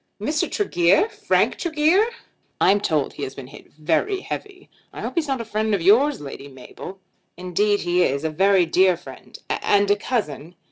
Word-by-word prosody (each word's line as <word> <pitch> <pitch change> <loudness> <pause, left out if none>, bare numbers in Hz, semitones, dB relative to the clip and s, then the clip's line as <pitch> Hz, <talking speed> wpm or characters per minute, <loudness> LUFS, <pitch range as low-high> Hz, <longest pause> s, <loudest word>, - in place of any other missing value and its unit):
"Mr. 300 +9 -1
Tregear! 195 - +2
Frank - - 0
Tregear!" 335 +5 +2 0.5
"I'm 200 +2 +4
told 155 -7 0
he - - -10
has 135 - -5
been 135 - -8
hit 145 +3 -15
very 165 - -1
heavy. 390 -2 -7 0.2
I - - -9
hope - - -4
he's 335 -3 -1
not 270 -2 -1
a 230 - -5
friend 215 0 0
of 190 - -3
yours, 260 - +4
Lady 140 -1 -9
Mabel." 140 +7 -11 0.4
"Indeed 200 +3 0
he 175 +1 +1
is; 140 -3 0
a 160 - -1
very 190 +2 +3
dear 180 +2 +3
friend 175 - -13
and 205 0 +1
a - - +5
cousin." 180 - -4
195 Hz, 180 wpm, -22 LUFS, 165-270 Hz, 0.5 s, a